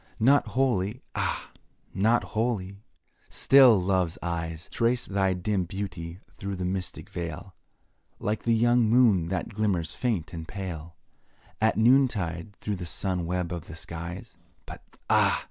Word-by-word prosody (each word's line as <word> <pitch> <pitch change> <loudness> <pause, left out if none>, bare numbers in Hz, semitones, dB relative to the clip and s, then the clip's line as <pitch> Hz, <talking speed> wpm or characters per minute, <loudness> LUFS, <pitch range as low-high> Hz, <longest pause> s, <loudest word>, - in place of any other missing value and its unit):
Not 135 +6 +4
wholly 120 -3 +1
ah! - - -2 0.4
not 110 +5 +3
wholly 105 -4 -1 0.5
still 130 -6 +6
Love's 90 -2 0
eyes 85 -1 -4
Trace 120 +1 +1
thy 95 -1 +1
dim 90 +1 -1
beauty 90 -2 -6 0.2
through 100 0 -3
the 90 0 -3
mystic 95 0 -4
veil, 85 +2 -6 0.6
Like 105 +1 -2
the 115 -1 +2
young 120 0 +3
moon 110 -8 +4
that 90 +1 -2
glimmers 95 -7 0
faint 100 -9 -2
and 80 -1 -6
pale, 85 -5 -6 0.7
At 110 0 +3
noontide 105 -7 +2
through 105 0 -4
the 90 -1 -6
sun 90 +1 -2
web 90 -1 -2
of 85 0 -6
the 85 - -9
skies; 85 +3 -7 0.3
But - - -10 0.3
ah! - - +4
95 Hz, 140 wpm, -27 LUFS, 85-110 Hz, 0.7 s, still